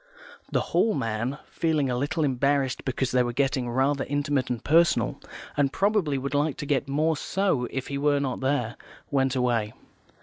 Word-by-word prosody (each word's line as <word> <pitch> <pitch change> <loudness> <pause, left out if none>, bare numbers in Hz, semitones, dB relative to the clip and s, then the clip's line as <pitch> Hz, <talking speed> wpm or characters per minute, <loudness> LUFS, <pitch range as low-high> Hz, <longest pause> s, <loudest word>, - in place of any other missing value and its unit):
The - - +2
Hall 220 -2 +3
man, 115 +5 -2
feeling 155 -4 +1
a - - 0
little 145 +5 -1
embarrassed 140 -1 +1
because 130 -1 -1
they 125 - +3
were 120 -1 0
getting 135 -1 0
rather 135 +3 +1
intimate 145 -2 0
and 120 -2 -3
personal, 170 +3 +3 0.3
and 140 -1 +2
probably 195 -8 +1
would 140 +2 -4
like 145 0 +1
to 145 - -5
get 140 -1 0
more 155 +3 +1
so 165 -7 0
if 135 -1 -4
he 140 0 -2
were 145 0 +2
not 135 -3 -2
there, 130 -4 -1 0.3
went 135 -2 +1
away. 120 -4 0
140 Hz, 175 wpm, -26 LUFS, 125-145 Hz, 0.3 s, Hall